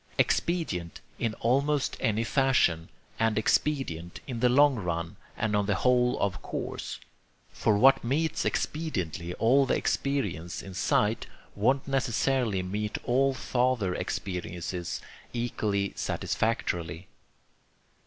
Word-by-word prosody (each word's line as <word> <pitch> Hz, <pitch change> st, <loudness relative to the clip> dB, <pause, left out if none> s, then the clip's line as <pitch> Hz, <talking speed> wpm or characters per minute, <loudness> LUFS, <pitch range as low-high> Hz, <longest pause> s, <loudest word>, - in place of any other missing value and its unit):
Expedient 125 Hz, -, 0 dB, 0.2 s
in 110 Hz, -2 st, -1 dB
almost 140 Hz, +4 st, +2 dB
any 110 Hz, +1 st, +1 dB
fashion; 120 Hz, -, +2 dB, 0.3 s
and 115 Hz, -1 st, +2 dB
expedient 110 Hz, -, 0 dB
in 125 Hz, -4 st, -5 dB
the 125 Hz, +1 st, +4 dB
long 140 Hz, +1 st, +5 dB
run 85 Hz, -4 st, -3 dB, 0.2 s
and 105 Hz, -1 st, 0 dB
on 105 Hz, -1 st, +1 dB
the 100 Hz, -, +2 dB
whole 125 Hz, +4 st, +2 dB
of 100 Hz, -2 st, -1 dB
course; -, -, -5 dB, 0.5 s
for 105 Hz, -, +2 dB
what 135 Hz, +5 st, +6 dB
meets 150 Hz, +7 st, 0 dB
expediently 90 Hz, -, -2 dB
all 135 Hz, +4 st, +4 dB
the -, -, +2 dB
experience 85 Hz, -, -1 dB
in 95 Hz, -, -9 dB
sight 105 Hz, +4 st, +1 dB, 0.3 s
won't 130 Hz, +7 st, +1 dB
necessarily 130 Hz, -5 st, +1 dB
meet 105 Hz, +3 st, -3 dB
all 135 Hz, +2 st, +2 dB
farther 120 Hz, -6 st, +1 dB
experiences 90 Hz, -1 st, -4 dB, 0.3 s
equally 105 Hz, -4 st, -1 dB
satisfactorily. 90 Hz, -6 st, -2 dB
115 Hz, 115 wpm, -28 LUFS, 90-135 Hz, 0.5 s, what